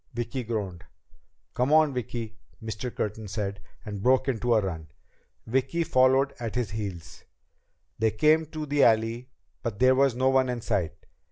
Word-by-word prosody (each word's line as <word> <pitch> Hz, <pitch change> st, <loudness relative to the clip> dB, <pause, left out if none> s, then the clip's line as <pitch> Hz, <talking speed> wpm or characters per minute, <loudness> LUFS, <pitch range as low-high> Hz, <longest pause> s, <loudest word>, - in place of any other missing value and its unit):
Vicki 120 Hz, +2 st, -3 dB
groaned. 100 Hz, -6 st, -4 dB, 0.7 s
"Come 125 Hz, +3 st, 0 dB
on, 155 Hz, -2 st, +5 dB
Vicki," 115 Hz, -3 st, -4 dB, 0.2 s
Mr. 115 Hz, +2 st, -5 dB
Curtin 110 Hz, 0 st, -4 dB
said, 100 Hz, 0 st, -3 dB, 0.3 s
and 105 Hz, -2 st, -5 dB
broke 130 Hz, +5 st, +3 dB
into 120 Hz, -2 st, +1 dB
a 110 Hz, -, +4 dB
run. 80 Hz, -5 st, -5 dB, 0.6 s
Vicki 135 Hz, +8 st, 0 dB
followed 130 Hz, -1 st, +3 dB
at 115 Hz, -2 st, -4 dB
his 120 Hz, -5 st, -1 dB
heels. 100 Hz, -6 st, -6 dB, 0.8 s
They 110 Hz, -, +3 dB
came 155 Hz, +8 st, +3 dB
to 155 Hz, 0 st, -5 dB
the 145 Hz, -1 st, +2 dB
alley, 115 Hz, +2 st, +2 dB, 0.3 s
but 115 Hz, -4 st, -4 dB
there 130 Hz, +3 st, +5 dB
was 135 Hz, -2 st, +3 dB
no 130 Hz, +1 st, +2 dB
one 130 Hz, -1 st, +3 dB
in 120 Hz, -1 st, -3 dB
sight. 85 Hz, -6 st, -1 dB
120 Hz, 160 wpm, -27 LUFS, 110-130 Hz, 0.8 s, on